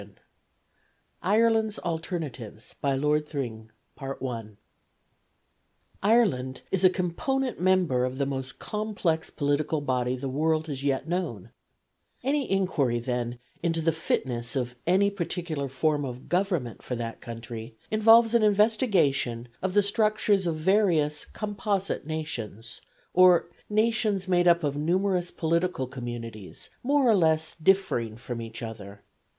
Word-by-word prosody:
] - - -42 0.2
IRELAND'S 225 -2 +3
ALTERNATIVES. 155 - -5
BY 140 -1 +1
LORD 150 +2 +1
THRING. 115 -6 -5 2.3
Ireland 195 - +2
is 190 -1 +1
a 185 - +8
component 235 +9 -1
member 180 -9 +2
of 130 +1 -2
the 140 - +1
most 135 -2 -4
complex 205 -7 -2
political 145 +2 0
body 125 -3 0
the 130 +2 -4
world 155 +4 +1
has 140 -2 -4
yet 140 +2 0
known; 170 - -3 0.7
any 275 +1 0
inquiry, 170 -11 +1
then, 120 0 -2 0.2
into 165 -1 0
the 165 0 +2
fitness 125 -6 -2
of 125 -2 -2
any 195 +3 +4
particular 170 -6 -3
form 145 +2 0
of 125 -1 -6
government 175 - -1
for 125 - -4
that 115 -1 -5
country 115 -1 -8 0.2
involves 225 +1 +6
an 235 - +5
investigation 195 - +2
of 190 +1 -2
the 205 - +5
structures 210 -2 +2
of 165 - 0
various 160 -4 +2
composite 200 -5 -2
nations, 115 -8 -5 0.3
or 180 -1 +5 0.2
nations 215 -3 +1
made 175 -1 +3
up 170 -1 +5
of 145 -1 0
numerous 180 +4 +1
political 170 -3 0
communities 120 -5 -7
more 280 0 +3
or 225 - +6
less 160 -3 +2
differing 155 - +1
from 120 0 -6
each 115 +1 -7
other. 100 -3 -8
160 Hz, 125 wpm, -27 LUFS, 125-195 Hz, 2.3 s, a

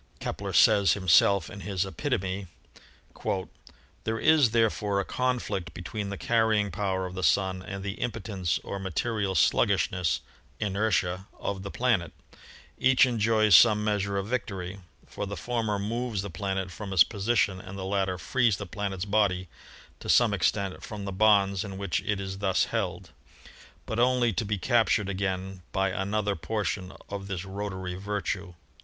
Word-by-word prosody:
Kepler - - -4
says 100 -4 +5
him 95 -2 -5
self 95 +1 +5
in 105 - -9
his 95 -1 -2
"Epitome": 95 +1 -2 1.6
"There 110 0 -1
is, 150 0 +5
therefore, 105 -3 +1
a 100 - -1
conflict 120 -9 -2
between 100 +3 -5
the 100 - -5
carrying 110 -3 +2
power 95 0 -1
of 90 - -6
the 95 - -4
Sun 95 0 +2
and 95 0 -6
the 100 +1 -5
impotence 100 -6 -2
or 100 - -5
material 95 +1 -1
slug - - +4
gishness 80 -8 0 0.4
(inertia) 100 -2 0
of 95 -1 -3
the 100 - -6
planet; 100 -9 0 0.7
each 130 +1 +5
enjoys 110 -4 +4
some 105 +2 +6
measure 100 -2 0
of 100 - -1
victory, 100 -5 -4 0.3
for 100 - -5
the 100 - -5
former 115 -4 -1
moves 110 0 -2
the 100 - -6
planet 95 +1 -3
from 100 +2 -7
its 85 -3 +8
position 100 -3 0
and 95 +1 -9
the 95 - -5
latter 95 -1 0
frees 115 +4 +1
the 100 - -5
planet's 95 0 -4
body 100 -4 +1 0.5
to - - -8
some - - +5
extent 100 -1 0
from 105 -2 -6
the 100 - -3
bonds 100 -1 +3
in 100 -3 -7
which 100 -3 -1
it 105 -2 -1
is 95 0 -5
thus 95 -2 +2
held,... - - -3 0.7
but 110 - -3
only 125 -2 +3
to 115 - -1
be 105 0 -1
captured 110 -2 +2
again 95 -1 -3
by 95 -1 +1
an 95 +1 -3
other 105 -1 +1
portion 95 +2 -3 0.2
of 100 -1 -5
this 95 -2 -4
rotatory 95 -2 -5
virtue." 95 -1 -4
100 Hz, 160 wpm, -28 LUFS, 95-105 Hz, 1.6 s, its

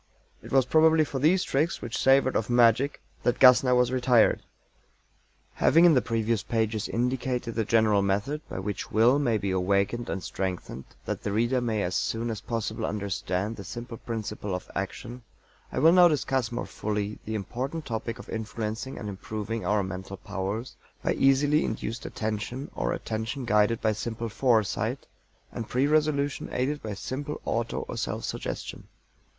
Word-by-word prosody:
It - - -11
was 135 -2 +4
probably 160 +3 +5
for 135 - -4
these 175 +7 +3
tricks 150 +5 0
which 115 -2 -5
savored 135 0 +4
of 110 - 0
magic 120 +3 +4 0.2
that 120 - +1
GASSNER 125 0 +7
was 125 0 +3
"retired." 125 -3 +3 1.1
Having 165 +4 +5
in 170 - +7
the 130 - +4
previous 115 -2 0
pages 110 0 -1
indicated 125 0 -1
the 110 -1 -1
general 110 -2 +3
method 100 +10 -1
by - - -5
which 100 +1 -4
Will 120 +6 +4
may 120 -6 +2
be 100 -2 -2
awakened 100 +5 0
and 95 -2 -3
strengthened, 90 -8 -4 0.2
that - - -3
the 100 - -3
reader 120 +4 +1
may 110 -4 0
as 90 +1 -2
soon 115 +1 -1
as 110 -2 -5
possible 115 -2 -3
understand 100 0 -2
the 100 - -8
simple 120 +4 -7
principle 105 -4 -4
of 90 - -7
action, 115 +5 -5 0.5
I - - -6
will 160 - +6
now 180 0 +8
discuss 135 -6 0
more 120 - -3
fully 105 0 -3
the 110 - -3
important 130 - -4
topic 115 0 -4
of - - -11
influencing 110 +3 -4
and 105 - -6
improving 110 +3 -4
our 105 -1 +2
mental 95 +1 -6
powers 100 +7 -4 0.3
by - - +1
easily 145 +3 +3
induced 110 +1 -4
Attention, 110 +5 -4
or - - -1
attention 115 +4 -3
guided 105 +1 +3
by 110 - +2
simple 115 +2 -4
Foresight, 110 -2 +1 0.5
and 115 - -6
pre 130 +2 +2
resolution 150 -2 +1
aided 145 +4 -1
by 105 -2 -5
simple 140 +8 -5
auto 115 0 -1
or - - -6
self - - -3
suggestion. - - -5
115 Hz, 165 wpm, -27 LUFS, 105-130 Hz, 1.1 s, now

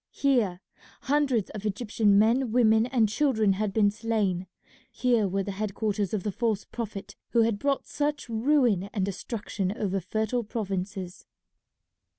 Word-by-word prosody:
Here 230 -10 +1 0.4
hundreds 270 -7 +1
of 210 - -7
Egyptian 210 -1 +1
men, 230 +3 +3
women, 225 -1 +4
and 245 -4 +2
children 220 -3 +2
had 205 +1 -1
been 205 0 +3
slain. 205 -5 -1 0.4
Here 240 -5 +2
were 195 +1 -1
the 200 - -4
head 200 0 -4
quarters 205 -3 -1
of 210 -4 -2
the 210 - -1
false 220 0 -1
Prophet 215 -4 -6 0.2
who 230 -1 +5
had 220 -2 0
brought 280 +2 0
such 295 -1 -2
ruin 230 -5 +2
and 195 -4 0
destruction 200 0 -3
over 195 -2 -1
fertile 220 +6 -1
provinces. 195 -4 -5
215 Hz, 150 wpm, -27 LUFS, 195-235 Hz, 0.4 s, who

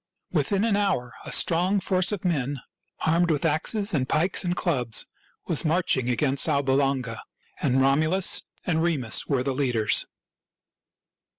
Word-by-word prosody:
Within 200 -1 0
an 225 -3 +1
hour 190 -13 -1
a - - -6
strong 180 +4 +2
force 185 0 +1
of 200 -3 -5
men, 145 -5 -1 0.5
armed 170 +2 +2
with 150 -1 0
axes 200 +7 +1
and 130 -4 -1
pikes 175 +5 +2
and 175 -1 -1
clubs, 125 -11 0 0.4
was 160 - 0
marching 160 -6 0
against 135 +3 +1
Alba 140 -2 +1
Longa; 135 -4 -1 0.4
and 130 +1 +1
Romulus 155 +8 +3 0.2
and 160 -3 0
Remus 150 -9 +1
were 135 -4 0
the 135 0 -2
leaders. 125 -5 +1
155 Hz, 140 wpm, -25 LUFS, 130-180 Hz, 0.5 s, Romulus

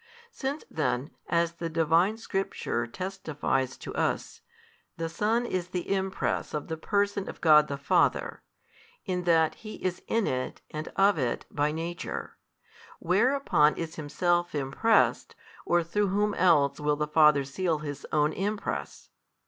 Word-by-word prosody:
Since 280 - -4
then, 145 -2 -2 0.2
as 170 -1 +1
the 165 0 -3
Divine 165 +6 +2
Scripture 195 - -2
testifieth 150 -5 -2
to - - -6
us, - - -2 0.6
the 165 - -2
Son 220 +8 0
is 185 -6 -2
the 180 +1 -2
Impress 190 -4 -2
of 150 - -4
the 160 - -2
Person 200 +3 -1
of - - -9
God 150 -2 +6
the 140 - -4
Father, 140 - +1 0.6
in 180 -3 -2
that 165 -2 +4
He 215 -1 -7
is 185 -1 -3
in 225 -2 +1
It 130 0 -2
and 155 +1 -5
of 195 -3 +4
It 125 -3 -1
by 145 +1 +1
Nature, 165 +2 -5 0.6
whereupon 200 - +3
is 165 -1 -5
Himself 175 +3 0
impressed, 145 +11 +2 0.3
or 175 0 +3
through 205 +5 0
whom 205 +2 +1
else 160 -8 +3
will 150 0 +1
the 150 +1 -1
Father 150 -2 +5
seal 160 +5 -1
His 145 -2 -6
Own 150 0 +2
Impress? 205 +2 -4
170 Hz, 145 wpm, -28 LUFS, 150-195 Hz, 0.6 s, God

